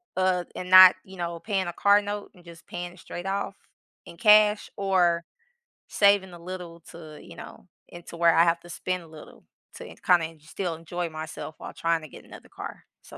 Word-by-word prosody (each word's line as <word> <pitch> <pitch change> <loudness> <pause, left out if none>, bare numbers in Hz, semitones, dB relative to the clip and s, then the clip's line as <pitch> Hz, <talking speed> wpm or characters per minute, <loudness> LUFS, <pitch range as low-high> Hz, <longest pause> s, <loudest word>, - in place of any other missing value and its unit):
o 185 - -1
uh, 180 -1 +1
and 180 - -6
not 185 0 +10
you 190 0 -13
know, 170 -1 -4
paying 195 -3 -2
a 175 - -4
car 205 +1 +4
note 205 0 -6
and 180 -2 -19
just 170 -1 -14
paying 175 0 -7
it 180 - -18
straight 175 +2 -8
off 195 0 -3 0.5
in 170 -1 -13
cash 210 -1 +5
or 180 -4 +2 0.6
saving 200 -3 +3
a 170 - -11
little 170 -1 -9
to, 155 -2 -12
you - - -13
know - - -12 0.3
into 175 0 -11
where 170 -1 +4
I 165 - +6
have 170 0 +2
to 175 - -16
spend 185 +1 -3
a 165 - -15
little 155 -1 -14 0.3
to - - -9
en - - -12
kinda 175 -2 +4
en 160 -1 -17
still 165 +3 -5
enjoy 170 +1 -5
myself 155 0 -8
while - - -9
trying 165 -1 0
to - - -9
get - - -13
another - - -14
car. - - -9 0.2
So, - - -13
175 Hz, 215 wpm, -26 LUFS, 170-190 Hz, 0.6 s, not